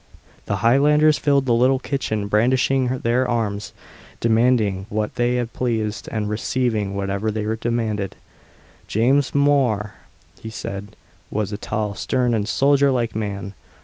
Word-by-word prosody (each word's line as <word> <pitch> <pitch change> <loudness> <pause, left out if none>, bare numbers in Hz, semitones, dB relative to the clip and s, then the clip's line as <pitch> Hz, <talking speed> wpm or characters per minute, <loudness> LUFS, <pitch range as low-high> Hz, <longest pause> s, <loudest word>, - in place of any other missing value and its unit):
The 100 - 0
Highlanders 150 +5 +4
filled 140 -2 +2
the 120 - +2
little 130 +3 +4
kitchen, 120 -7 -2
brandishing 125 +5 +2 0.2
their 125 +2 +1
arms, 105 -4 -2 0.5
demanding 110 -4 +2
what 105 0 -2
they 120 0 0
pleased, 110 -3 -3
and 105 -2 -2
receiving 105 -2 -1
whatever 100 +2 -2
they 110 0 -2 0.2
demanded. 110 -4 -2 0.7
James 130 +7 +2
Mhor, 135 -8 +2 0.5
he 110 - -6
said, 100 -2 -7 0.3
was 105 -1 -2
a - - -3
tall, 105 -1 -2
stern, 125 +3 0
and 105 -1 -1
soldier 140 +2 +3
like 120 -4 -1
man. 100 -2 -4
115 Hz, 130 wpm, -21 LUFS, 105-130 Hz, 0.7 s, Highlanders